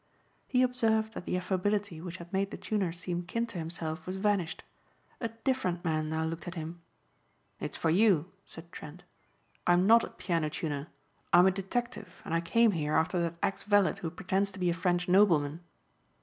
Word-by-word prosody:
He 255 Hz, -1 st, +3 dB
observed 225 Hz, -3 st, +1 dB
that 180 Hz, -, -7 dB
the -, -, -1 dB
affability 190 Hz, -1 st, -1 dB
which 180 Hz, +1 st, -6 dB
had 170 Hz, +2 st, -12 dB
made 195 Hz, +1 st, +1 dB
the -, -, -7 dB
tuner 200 Hz, -5 st, -1 dB
seem 175 Hz, +1 st, -3 dB
kin 230 Hz, +7 st, -2 dB
to 220 Hz, -6 st, -7 dB
himself 160 Hz, 0 st, -5 dB
was 185 Hz, -, -3 dB
vanished. 190 Hz, -4 st, 0 dB, 0.6 s
A 230 Hz, -, -1 dB
different 225 Hz, -6 st, -2 dB
man 155 Hz, -1 st, 0 dB
now 160 Hz, 0 st, -1 dB
looked 165 Hz, +2 st, -5 dB
at 175 Hz, -, -5 dB
him. 165 Hz, +1 st, -6 dB, 0.8 s
"It's -, -, -4 dB
for 160 Hz, -, +1 dB
you," 185 Hz, -3 st, +3 dB
said 170 Hz, +1 st, -11 dB
Trent. 160 Hz, 0 st, -10 dB, 0.6 s
"I'm 175 Hz, +1 st, +5 dB
not 230 Hz, +2 st, +7 dB
a -, -, -3 dB
piano 165 Hz, -4 st, -1 dB
tuner. 150 Hz, -1 st, -3 dB, 0.4 s
I'm 175 Hz, +1 st, +7 dB
a 190 Hz, -, +5 dB
detective 205 Hz, +1 st, -4 dB
and -, -, -4 dB
I 165 Hz, -, +2 dB
came 230 Hz, +6 st, +4 dB
here 155 Hz, -4 st, -1 dB
after 175 Hz, +2 st, +2 dB
that 170 Hz, 0 st, -1 dB
ex 195 Hz, -, 0 dB
valet 205 Hz, -2 st, +3 dB
who 165 Hz, -, -2 dB
pretends 190 Hz, +3 st, -1 dB
to 190 Hz, -, -9 dB
be 180 Hz, -1 st, +2 dB
a -, -, +1 dB
French 175 Hz, +1 st, 0 dB
nobleman." 170 Hz, -6 st, +4 dB
180 Hz, 190 wpm, -30 LUFS, 165-205 Hz, 0.8 s, not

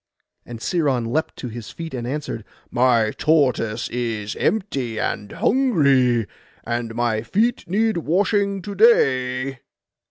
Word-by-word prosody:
And 120 Hz, -1 st, -7 dB
Sciron 135 Hz, -2 st, 0 dB
leapt 150 Hz, +8 st, -1 dB
to 125 Hz, -, -6 dB
his 115 Hz, -1 st, -8 dB
feet, 165 Hz, -2 st, -7 dB
and 120 Hz, -2 st, -4 dB
answered—'My 120 Hz, -4 st, -1 dB
tortoise 130 Hz, -8 st, +2 dB
is 115 Hz, -4 st, -3 dB
empty 135 Hz, -, -1 dB
and 105 Hz, -1 st, -3 dB
hungry, 140 Hz, -, +3 dB, 0.4 s
and 120 Hz, -1 st, -3 dB
my 120 Hz, -2 st, 0 dB
feet 215 Hz, -, 0 dB
need 215 Hz, +2 st, +1 dB
washing 195 Hz, +4 st, +1 dB
to 200 Hz, -, -5 dB
day. 130 Hz, -, +3 dB
130 Hz, 120 wpm, -22 LUFS, 120-175 Hz, 0.4 s, hungry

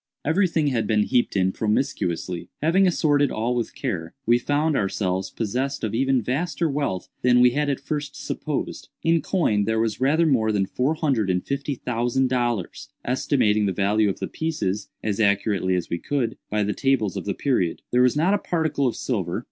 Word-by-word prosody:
Every 180 Hz, +6 st, +3 dB
thing 160 Hz, -4 st, +1 dB
had 115 Hz, -5 st, -1 dB
been 105 Hz, -1 st, +3 dB
heaped 125 Hz, 0 st, +1 dB
in 95 Hz, 0 st, +2 dB
promiscuously. 90 Hz, -, -2 dB
Having 185 Hz, +5 st, +4 dB
assorted 145 Hz, -4 st, +2 dB
all 115 Hz, +3 st, -1 dB
with 120 Hz, -2 st, -3 dB
care, 80 Hz, -2 st, -4 dB
we 120 Hz, +1 st, +4 dB
found 145 Hz, +4 st, +1 dB
ourselves 95 Hz, -3 st, -1 dB
possessed 130 Hz, +5 st, -2 dB
of 110 Hz, -, -2 dB
even 130 Hz, 0 st, +2 dB
vaster 165 Hz, -, -1 dB
wealth 140 Hz, -, -2 dB
than 125 Hz, 0 st, +4 dB
we 125 Hz, 0 st, +6 dB
had 145 Hz, +3 st, 0 dB
at 140 Hz, -, -1 dB
first 150 Hz, -1 st, -4 dB
supposed. -, -, -4 dB
In 165 Hz, 0 st, +3 dB
coin 135 Hz, -, +1 dB
there 110 Hz, +1 st, 0 dB
was 110 Hz, 0 st, -1 dB
rather 155 Hz, +5 st, +3 dB
more 115 Hz, -8 st, +2 dB
than 100 Hz, -2 st, +1 dB
four 130 Hz, +10 st, 0 dB
hundred 135 Hz, -, 0 dB
and 90 Hz, 0 st, 0 dB
fifty 140 Hz, +1 st, -2 dB
thousand 125 Hz, +2 st, 0 dB
dollars—estimating 120 Hz, -1 st, 0 dB
the 95 Hz, -, 0 dB
value 105 Hz, +3 st, +2 dB
of 95 Hz, -, -3 dB
the -, -, -4 dB
pieces, 105 Hz, -12 st, -3 dB
as 105 Hz, -1 st, -1 dB
accurately 100 Hz, -2 st, +2 dB
as 90 Hz, -, -2 dB
we 85 Hz, -, -1 dB
could, 125 Hz, -2 st, -1 dB
by 105 Hz, 0 st, +1 dB
the 105 Hz, +1 st, -1 dB
tables 135 Hz, -8 st, +1 dB
of -, -, -4 dB
the 100 Hz, -, -2 dB
period. 120 Hz, -, 0 dB
There 125 Hz, -, +4 dB
was 125 Hz, +2 st, +3 dB
not 175 Hz, +6 st, +3 dB
a 205 Hz, -, +2 dB
particle 160 Hz, -5 st, 0 dB
of 120 Hz, -, -1 dB
silver. 95 Hz, -9 st, -2 dB
120 Hz, 190 wpm, -24 LUFS, 105-145 Hz, -, we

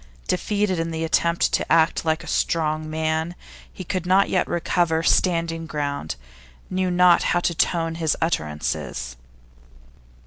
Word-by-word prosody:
Defeated 190 Hz, 0 st, 0 dB
in 165 Hz, 0 st, -1 dB
the 160 Hz, 0 st, -3 dB
attempt 170 Hz, +1 st, +1 dB
to -, -, 0 dB
act 160 Hz, 0 st, +3 dB
like 160 Hz, -1 st, 0 dB
a -, -, -11 dB
strong 155 Hz, -1 st, 0 dB
man, 160 Hz, +2 st, -1 dB, 0.4 s
he 185 Hz, -, -8 dB
could 180 Hz, 0 st, -3 dB
not 190 Hz, +2 st, +4 dB
yet 185 Hz, -, +1 dB
recover 170 Hz, -1 st, 0 dB
standing 165 Hz, -2 st, +1 dB
ground, 140 Hz, -, -3 dB, 0.6 s
knew 185 Hz, 0 st, 0 dB
not 180 Hz, -1 st, +5 dB, 0.2 s
how -, -, +4 dB
to 175 Hz, -, 0 dB
tone 165 Hz, 0 st, 0 dB
his 165 Hz, -2 st, 0 dB
utterances. 75 Hz, -, -2 dB
165 Hz, 140 wpm, -23 LUFS, 160-175 Hz, 0.6 s, not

